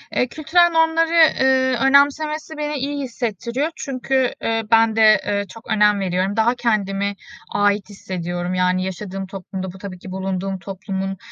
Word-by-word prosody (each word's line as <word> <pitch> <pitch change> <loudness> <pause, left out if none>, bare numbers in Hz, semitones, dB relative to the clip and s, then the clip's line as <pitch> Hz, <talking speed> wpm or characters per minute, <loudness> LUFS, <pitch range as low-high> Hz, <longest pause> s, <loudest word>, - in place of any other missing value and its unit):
Eee, 250 - +2
kültürel 320 +6 +3
normları, 325 0 +2
eee, 265 -5 +4
önemsemesi 300 +3 +2
beni 300 0 -3
iyi 285 +1 -3
hissettiriyor 240 - -3
çünkü, 260 -1 -1
eee, 225 0 0
ben 225 -1 +4
de, 225 - +2 0.2
eee, 200 0 -1
çok 225 +3 -13
önem 210 -1 +4
veriyorum. 190 +1 -1
Daha 230 +3 +2
kendimi 200 -4 -1 0.4
ait 205 0 +1
hissediyorum. 175 -2 -4
Yani, 185 0 +1
yaşadığım 190 +1 -5
toplumda, 190 0 -6
bu - - -12
tabii 185 -2 -8
ki 185 - -10
bulunduğum 190 0 -3
toplumun, 195 +1 -5
210 Hz, 150 wpm, -20 LUFS, 190-270 Hz, 0.4 s, eee